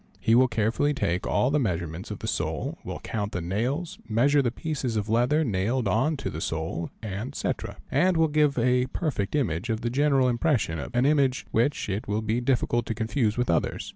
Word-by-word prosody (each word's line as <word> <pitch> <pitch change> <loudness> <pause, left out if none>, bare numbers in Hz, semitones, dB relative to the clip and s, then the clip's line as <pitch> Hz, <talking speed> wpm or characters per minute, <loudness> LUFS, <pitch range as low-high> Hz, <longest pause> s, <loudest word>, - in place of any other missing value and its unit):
He 115 - +2
will 130 +2 +6
carefully 120 +6 +1
take 90 -7 -1
all 125 - +2
the 150 - +2
measurements 85 - -2
of - - -5
the - - -6
sole, - - -2
will - - -5
count 105 -2 -3
the - - -1
nails, 130 - -2
measure 140 +6 +4
the 125 - +1
pieces 135 -2 -3
of 105 0 -2
leather 125 +8 +3
nailed 110 +1 0
on 145 +10 +1
to - - -4
the 80 - -5
sole, 80 +1 -3
&c., 110 +7 -3 0.4
and 185 -1 +3
will 160 0 +4
give 150 -2 +2
a 125 +1 +2
perfect 130 - -2
image 110 - -1
of 110 0 -1
the 120 -1 -1
general 135 -1 +3
impression, 120 - +1
an 125 +1 +2
image 140 -3 +2
which 120 +6 +1
it 100 +2 -3
will 105 +2 -1
be 110 +3 0
difficult 120 -2 +1
to 115 - -2
confuse 110 -1 0
with 125 -1 +1
others. 85 - 0
120 Hz, 200 wpm, -26 LUFS, 105-140 Hz, 0.4 s, will